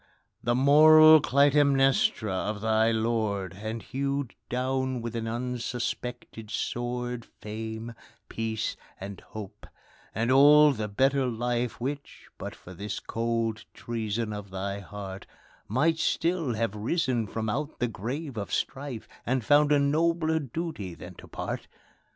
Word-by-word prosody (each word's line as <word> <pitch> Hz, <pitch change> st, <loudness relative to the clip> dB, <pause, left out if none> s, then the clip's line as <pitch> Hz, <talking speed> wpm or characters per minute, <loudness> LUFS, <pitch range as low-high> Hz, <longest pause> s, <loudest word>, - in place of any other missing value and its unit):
The 120 Hz, +1 st, +1 dB
moral 155 Hz, +3 st, +8 dB
Clytemnestra 135 Hz, -6 st, +3 dB
of 105 Hz, +3 st, -2 dB
thy 110 Hz, 0 st, +3 dB
lord, 110 Hz, -5 st, 0 dB
And 110 Hz, +1 st, -4 dB
hewed 140 Hz, -1 st, -2 dB, 0.2 s
down, 130 Hz, +1 st, -1 dB
with 115 Hz, 0 st, -5 dB
an 115 Hz, -1 st, -2 dB
unsuspected 120 Hz, -1 st, -4 dB
sword, 120 Hz, +1 st, -3 dB
Fame, 110 Hz, +1 st, -7 dB, 0.3 s
peace, 110 Hz, -1 st, -3 dB, 0.2 s
and 100 Hz, 0 st, -7 dB
hope 110 Hz, -3 st, -10 dB, 0.5 s
and 115 Hz, +4 st, +1 dB
all 145 Hz, +2 st, +7 dB
the 110 Hz, -5 st, -3 dB
better 135 Hz, +5 st, +2 dB
life 120 Hz, 0 st, -2 dB
Which, 140 Hz, +3 st, -6 dB
but -, -, -6 dB
for 95 Hz, -, -12 dB
this 100 Hz, +3 st, -5 dB
cold 115 Hz, -1 st, -2 dB
treason 110 Hz, -1 st, -3 dB
of 105 Hz, -1 st, -7 dB
thy 100 Hz, +1 st, -4 dB
heart, 100 Hz, 0 st, -8 dB, 0.4 s
Might 155 Hz, -, +2 dB
still 165 Hz, -7 st, 0 dB
have 115 Hz, -2 st, -1 dB
risen 120 Hz, +1 st, 0 dB
from 110 Hz, +3 st, -3 dB
out 145 Hz, +7 st, -2 dB
the 125 Hz, -, 0 dB
grave 125 Hz, +5 st, -5 dB
of 100 Hz, -2 st, -4 dB
strife, 135 Hz, -4 st, -3 dB, 0.2 s
And 125 Hz, -2 st, -1 dB
found 145 Hz, +2 st, +5 dB
a 145 Hz, -, +6 dB
nobler 160 Hz, +3 st, +2 dB
duty 140 Hz, -, -5 dB
than -, -, -10 dB
to -, -, -13 dB
part. -, -, -5 dB
120 Hz, 135 wpm, -28 LUFS, 110-140 Hz, 0.5 s, moral